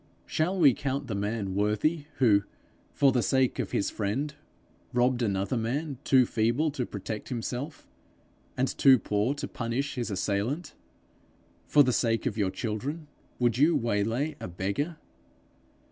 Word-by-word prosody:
Shall 180 Hz, +5 st, 0 dB
we 145 Hz, -7 st, +6 dB
count 140 Hz, +1 st, -3 dB
the 110 Hz, -, -4 dB
man 100 Hz, -1 st, -2 dB
worthy 105 Hz, -, +1 dB
who, 105 Hz, -6 st, +5 dB, 0.5 s
for 140 Hz, -2 st, +4 dB
the 125 Hz, -2 st, +2 dB
sake 130 Hz, +1 st, +1 dB
of 110 Hz, -6 st, -1 dB
his 100 Hz, -, -1 dB
friend, 125 Hz, +9 st, -2 dB, 0.6 s
robbed 125 Hz, 0 st, +2 dB
another 100 Hz, +2 st, 0 dB
man 135 Hz, +5 st, -2 dB
too 130 Hz, -2 st, +5 dB
feeble 120 Hz, +8 st, +1 dB
to 130 Hz, -4 st, -3 dB
protect 105 Hz, +1 st, -6 dB
himself, 125 Hz, +4 st, -5 dB, 0.7 s
and 130 Hz, -, +2 dB
too 135 Hz, -1 st, +5 dB
poor 105 Hz, +4 st, 0 dB
to 145 Hz, -, -4 dB
punish 125 Hz, +4 st, -3 dB
his 120 Hz, -3 st, -3 dB
assailant? 105 Hz, -, -2 dB, 0.9 s
For 145 Hz, -, +6 dB
the 125 Hz, -2 st, +1 dB
sake 115 Hz, -1 st, +1 dB
of 120 Hz, -6 st, -1 dB
your 100 Hz, -4 st, +1 dB
children, 125 Hz, -, -4 dB, 0.3 s
would 120 Hz, -1 st, +1 dB
you 160 Hz, +4 st, +5 dB
waylay 115 Hz, +7 st, 0 dB
a -, -, -5 dB
beggar? 100 Hz, -, -3 dB
125 Hz, 145 wpm, -28 LUFS, 105-140 Hz, 0.9 s, we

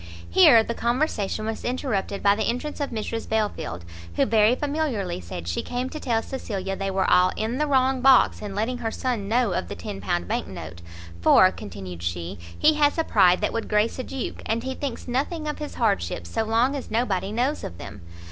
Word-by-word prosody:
Here 220 Hz, -, +7 dB
the 235 Hz, -, -3 dB
conversation 235 Hz, -4 st, -1 dB
was 220 Hz, 0 st, -4 dB
interrupted 240 Hz, -6 st, -2 dB
by 200 Hz, 0 st, +5 dB
the 215 Hz, 0 st, -1 dB
entrance 250 Hz, +6 st, -3 dB
of 285 Hz, -, -1 dB
Mrs 225 Hz, 0 st, -4 dB
Belfield, 210 Hz, -, -2 dB, 0.3 s
who -, -, +3 dB
very 220 Hz, +2 st, +4 dB
familiarly 280 Hz, -, -2 dB
said 85 Hz, -1 st, -7 dB
she 85 Hz, -, -1 dB
came 250 Hz, +1 st, -4 dB
to 310 Hz, -, -6 dB
tell 230 Hz, -5 st, 0 dB
Cecilia 195 Hz, -7 st, -4 dB
they 195 Hz, 0 st, -3 dB
were 190 Hz, 0 st, 0 dB
all 180 Hz, 0 st, +5 dB
in 230 Hz, +5 st, -2 dB
the 300 Hz, -, +1 dB
wrong 265 Hz, -2 st, +2 dB
box 265 Hz, 0 st, +5 dB
in 205 Hz, -2 st, -6 dB
letting 235 Hz, +4 st, -1 dB
her 230 Hz, -2 st, -2 dB
son 230 Hz, -4 st, -2 dB
know 235 Hz, 0 st, +2 dB
of 90 Hz, -, -2 dB
the -, -, -6 dB
£10 85 Hz, 0 st, -3 dB
bank -, -, -2 dB
note, 85 Hz, -, -8 dB, 0.4 s
"for," 185 Hz, -, +6 dB
continued 95 Hz, -3 st, -8 dB
she, 85 Hz, 0 st, -4 dB, 0.2 s
"he 310 Hz, -, +5 dB
has 295 Hz, 0 st, +2 dB
a 325 Hz, -, +2 dB
pride 185 Hz, -, +4 dB
that -, -, 0 dB
would 230 Hz, -, -3 dB
grace 210 Hz, +4 st, +1 dB
a -, -, -2 dB
duke, 265 Hz, 0 st, -5 dB
and 230 Hz, +1 st, -1 dB
he 265 Hz, 0 st, -3 dB
thinks 265 Hz, -3 st, -5 dB
nothing 295 Hz, +6 st, -2 dB
of 300 Hz, -, -3 dB
his 300 Hz, -1 st, -6 dB
hardships, 85 Hz, -, -1 dB
so -, -, 0 dB
long 235 Hz, +5 st, +2 dB
as 275 Hz, -, -6 dB
nobody 205 Hz, -4 st, 0 dB
knows 255 Hz, +7 st, -1 dB
of 85 Hz, -, -6 dB
them. 100 Hz, +3 st, -9 dB
225 Hz, 205 wpm, -24 LUFS, 190-255 Hz, 0.4 s, Here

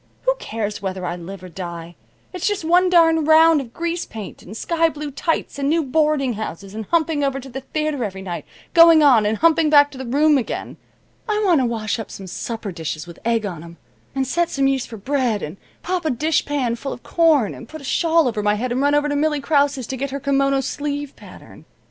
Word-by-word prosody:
Who -, -, +3 dB
cares 215 Hz, -2 st, -4 dB
whether 190 Hz, -2 st, -4 dB
I 175 Hz, 0 st, -2 dB
live 180 Hz, +2 st, -9 dB
or -, -, -8 dB
die? 170 Hz, -1 st, -7 dB, 0.4 s
It's 365 Hz, -, -2 dB
just 410 Hz, -6 st, -1 dB
one 360 Hz, +3 st, +4 dB
darned 325 Hz, -3 st, +4 dB
round 320 Hz, -1 st, +6 dB
of 240 Hz, -4 st, -10 dB
grease 340 Hz, +4 st, -3 dB
paint, 215 Hz, -4 st, -9 dB
and 210 Hz, +5 st, -10 dB
sky 330 Hz, +3 st, +1 dB
blue 300 Hz, -1 st, -6 dB
tights, 285 Hz, +1 st, -2 dB
and 280 Hz, 0 st, 0 dB
new 325 Hz, +1 st, +2 dB
boarding 295 Hz, -2 st, +1 dB
houses 200 Hz, -2 st, -6 dB
and 220 Hz, 0 st, -5 dB
humping 320 Hz, -3 st, +1 dB
over 275 Hz, -1 st, 0 dB
to 270 Hz, 0 st, -10 dB
the 265 Hz, +2 st, -6 dB
theater 305 Hz, -1 st, -2 dB
every 190 Hz, -2 st, -5 dB
night, 175 Hz, -2 st, -5 dB, 0.3 s
going 330 Hz, -2 st, +8 dB
on, 240 Hz, -7 st, +5 dB
and 215 Hz, +1 st, 0 dB
humping 325 Hz, +1 st, +3 dB
back 290 Hz, -1 st, +6 dB
to 265 Hz, -, -11 dB
the 265 Hz, -, -5 dB
room 290 Hz, +3 st, +3 dB
again. 240 Hz, -, -5 dB, 0.5 s
I 425 Hz, 0 st, +1 dB
want 340 Hz, -7 st, +4 dB
to 250 Hz, -, +1 dB
wash 225 Hz, 0 st, -2 dB
up 220 Hz, -, -6 dB
some 195 Hz, -, -9 dB
supper 210 Hz, +3 st, -5 dB
dishes 160 Hz, -2 st, -5 dB
with 170 Hz, -2 st, -12 dB
egg 230 Hz, -2 st, 0 dB
on 170 Hz, -5 st, -6 dB
'em, 170 Hz, 0 st, -12 dB, 0.4 s
and 270 Hz, -1 st, 0 dB
set 340 Hz, +6 st, 0 dB
some 275 Hz, -1 st, +1 dB
yeast 270 Hz, -2 st, 0 dB
for 225 Hz, -, -8 dB
bread, 245 Hz, -2 st, -1 dB
and 155 Hz, +6 st, -6 dB, 0.3 s
pop 360 Hz, 0 st, -2 dB
a 315 Hz, -, 0 dB
dishpan 285 Hz, -3 st, 0 dB
full 275 Hz, +3 st, -5 dB
of -, -, -12 dB
corn, 315 Hz, -, +3 dB
and 230 Hz, -, -11 dB
put 315 Hz, -1 st, -9 dB
a -, -, -12 dB
shawl 325 Hz, +2 st, +2 dB
over 220 Hz, -3 st, -1 dB
my 210 Hz, 0 st, +2 dB
head 240 Hz, +4 st, -3 dB
and 255 Hz, +2 st, 0 dB
run 285 Hz, +1 st, +3 dB
over 295 Hz, 0 st, +2 dB
to 290 Hz, -, -1 dB
Millie 300 Hz, 0 st, +1 dB
Krause's 280 Hz, -3 st, +1 dB
to 265 Hz, -, -5 dB
get 275 Hz, +2 st, -3 dB
her 280 Hz, +1 st, -4 dB
kimono 275 Hz, 0 st, +1 dB
sleeve 290 Hz, 0 st, -4 dB
pattern. -, -, -14 dB
275 Hz, 230 wpm, -21 LUFS, 220-310 Hz, 0.5 s, going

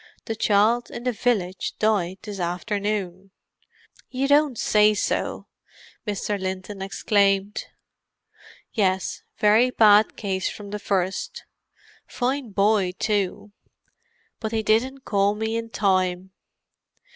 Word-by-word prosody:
The 225 Hz, -, -3 dB
child 220 Hz, +3 st, +2 dB
in 235 Hz, -, -7 dB
the 250 Hz, -, +1 dB
village 205 Hz, -6 st, -1 dB
died 195 Hz, -4 st, +1 dB
this 205 Hz, -3 st, -7 dB
afternoon." 195 Hz, +1 st, -3 dB, 0.8 s
"You 265 Hz, +1 st, -1 dB
don't 285 Hz, -3 st, +3 dB
say 210 Hz, 0 st, +4 dB
so!" -, -, -2 dB, 0.6 s
Mr. 205 Hz, 0 st, -2 dB
Linton 190 Hz, +1 st, -5 dB
exclaimed. 195 Hz, 0 st, +1 dB, 1.1 s
"Yes; 190 Hz, -3 st, 0 dB, 0.2 s
very 215 Hz, +4 st, +4 dB
bad 215 Hz, -3 st, +5 dB
case 190 Hz, -2 st, -2 dB
from 205 Hz, -1 st, -9 dB
the 210 Hz, -, -4 dB
first. 195 Hz, -, -2 dB, 0.6 s
Fine 255 Hz, -2 st, -2 dB
boy, 200 Hz, -2 st, +2 dB
too—but 205 Hz, +2 st, -5 dB
they 220 Hz, 0 st, -1 dB
didn't 255 Hz, +6 st, +1 dB
call 200 Hz, 0 st, +2 dB
me 220 Hz, +1 st, -2 dB
in 230 Hz, 0 st, -3 dB
time. 185 Hz, -3 st, 0 dB
210 Hz, 110 wpm, -24 LUFS, 195-225 Hz, 1.1 s, bad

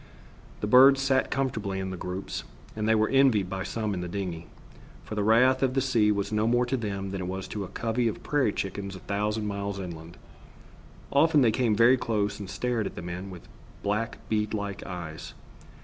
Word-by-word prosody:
The -, -, 0 dB
birds 130 Hz, +5 st, +7 dB
sat 135 Hz, -1 st, +2 dB
comfortably 110 Hz, -8 st, -2 dB
in 95 Hz, 0 st, -3 dB
groups, 95 Hz, +1 st, -5 dB, 0.3 s
and 110 Hz, 0 st, -1 dB
they 110 Hz, -, +5 dB
were 110 Hz, 0 st, +3 dB
envied 130 Hz, -9 st, +3 dB
by 95 Hz, -1 st, -3 dB
some 105 Hz, +2 st, -2 dB
in 90 Hz, -, -3 dB
the 90 Hz, -, -4 dB
dingey, 85 Hz, -3 st, -4 dB, 0.6 s
for -, -, -8 dB
the 105 Hz, -, -1 dB
wrath 125 Hz, +5 st, +4 dB
of 130 Hz, -1 st, +1 dB
the -, -, +3 dB
sea 115 Hz, -6 st, +3 dB
was 100 Hz, 0 st, -1 dB
no 105 Hz, +1 st, +1 dB
more 120 Hz, +1 st, +3 dB
to 125 Hz, +2 st, -1 dB
them 100 Hz, -5 st, -3 dB
than 95 Hz, -1 st, -4 dB
it 90 Hz, -, -4 dB
was 95 Hz, +1 st, -4 dB
to 105 Hz, -, -4 dB
a -, -, -6 dB
covey 115 Hz, +4 st, -1 dB
of 110 Hz, -, -4 dB
prairie 145 Hz, -7 st, +1 dB
chickens 100 Hz, 0 st, -4 dB
a -, -, -8 dB
thousand 105 Hz, +2 st, -1 dB
miles 100 Hz, -1 st, -3 dB
inland. 85 Hz, -2 st, -8 dB, 0.9 s
Often 150 Hz, +1 st, +4 dB
they 115 Hz, -4 st, +5 dB
came 115 Hz, -1 st, +1 dB
very 120 Hz, +4 st, +6 dB
close 105 Hz, -4 st, -1 dB
and 100 Hz, -3 st, -7 dB
stared 120 Hz, -3 st, -1 dB
at -, -, -9 dB
the -, -, -7 dB
men 90 Hz, +3 st, -6 dB
with 90 Hz, -3 st, -11 dB, 0.4 s
black 110 Hz, +3 st, -1 dB
bead 105 Hz, 0 st, 0 dB
like 100 Hz, -1 st, -4 dB
eyes. 85 Hz, -4 st, -7 dB
105 Hz, 205 wpm, -27 LUFS, 95-120 Hz, 0.9 s, birds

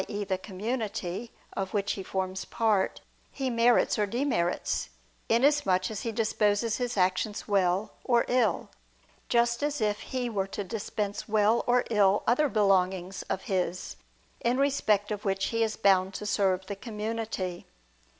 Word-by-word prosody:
e. 205 Hz, -1 st, -3 dB
the 190 Hz, -1 st, -1 dB
community, 210 Hz, 0 st, -4 dB, 0.2 s
of 195 Hz, +1 st, -3 dB
which 200 Hz, 0 st, +1 dB
he 195 Hz, -, -3 dB
forms 190 Hz, 0 st, -3 dB
part, 215 Hz, -4 st, 0 dB, 0.3 s
he 265 Hz, -2 st, -3 dB
merits 235 Hz, -1 st, +3 dB
or 210 Hz, -, +2 dB
demerits, 235 Hz, -6 st, -1 dB, 0.4 s
inasmuch 230 Hz, -7 st, +3 dB
as 210 Hz, -, -4 dB
he 230 Hz, -, -2 dB
disposes 215 Hz, 0 st, +1 dB
his 245 Hz, -3 st, -2 dB
actions 185 Hz, +3 st, 0 dB
well 195 Hz, 0 st, +1 dB
or 240 Hz, -2 st, +3 dB
ill: 250 Hz, 0 st, +1 dB, 0.6 s
just 235 Hz, +1 st, +2 dB
as 295 Hz, 0 st, -1 dB
if 210 Hz, -2 st, 0 dB
he 255 Hz, -1 st, -3 dB
were 200 Hz, -4 st, -1 dB
to 200 Hz, -, -4 dB
dispense 205 Hz, 0 st, -4 dB
well 215 Hz, +2 st, +3 dB
or 245 Hz, 0 st, +4 dB
ill 205 Hz, -2 st, +4 dB
other 275 Hz, +6 st, +3 dB
belongings 190 Hz, -3 st, +1 dB
of 190 Hz, -, -2 dB
his, 185 Hz, -2 st, -2 dB, 0.4 s
in 240 Hz, +2 st, +1 dB
respect 220 Hz, -7 st, +2 dB
of 210 Hz, -1 st, -3 dB
which 195 Hz, -1 st, 0 dB
he 230 Hz, 0 st, -1 dB
is 220 Hz, -1 st, 0 dB
bound 190 Hz, -2 st, +3 dB
to 210 Hz, -, -5 dB
serve 195 Hz, -2 st, +1 dB
the 200 Hz, -, -5 dB
community. 210 Hz, -4 st, -4 dB
210 Hz, 150 wpm, -28 LUFS, 195-235 Hz, 0.6 s, or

